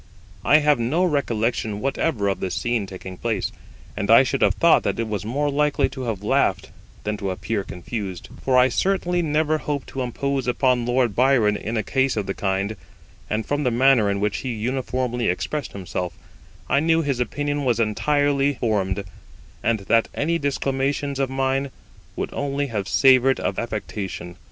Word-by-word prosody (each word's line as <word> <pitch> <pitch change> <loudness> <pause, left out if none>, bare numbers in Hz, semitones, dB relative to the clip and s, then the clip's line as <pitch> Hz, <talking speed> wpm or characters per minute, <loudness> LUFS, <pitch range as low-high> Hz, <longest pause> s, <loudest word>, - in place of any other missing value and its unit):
I 150 - +6
have 150 -4 +4
no 140 +10 +1
recollection 115 - 0
whatever 135 -3 0
of 95 -2 0
this 95 - -3
scene 120 -4 -1
taking 95 -1 -8
place, - - -2 0.4
and 100 0 -3
I 115 +3 +8
should 130 - -2
have - - +4
thought - - +5
that - - -2
I - - +1
was 105 -2 -4
more 145 +6 0
likely 150 +1 +2
to 130 -2 -6
have 105 -4 -3
laughed - - +1 0.3
than 105 0 -2
to 100 -2 -3
appear 100 +2 -2
confused, 95 +2 -6 0.2
for 130 -1 +3
I 125 0 +6
certainly 180 +5 0
never 155 0 +1
hoped 145 -3 -4
to 135 - -4
impose 135 +1 -2
upon 125 -1 +2
Lord 120 -3 +1
Byron 125 -5 +4
in 110 +3 -3
a 110 - 0
case 130 +2 +1
of 105 - -1
the 95 - -2
kind; 100 +2 -1 0.5
and 110 +1 -1
from 145 0 -1
the 125 - +2
manner 120 -3 +4
in 100 0 0
which 105 0 0
he 130 - -4
uniformly 125 +1 -2
expressed 140 +10 -3
himself, 90 -2 -4 0.5
I 140 - +3
knew 165 +2 +2
his 140 -4 -1
opinion 145 +4 -1
was 120 -3 +1
entirely 145 +5 +1
formed, 100 -5 -1 0.6
and 115 -3 +1
that 115 +4 +2
any 165 +3 0
disclamations 140 0 -1
of 135 -1 +1
mine 135 +1 0 0.5
would - - -4
only 140 0 -1
have 100 -3 -2
savoured 130 0 +5
of - - -2
affectation. 100 -6 -5
125 Hz, 175 wpm, -23 LUFS, 105-140 Hz, 0.6 s, I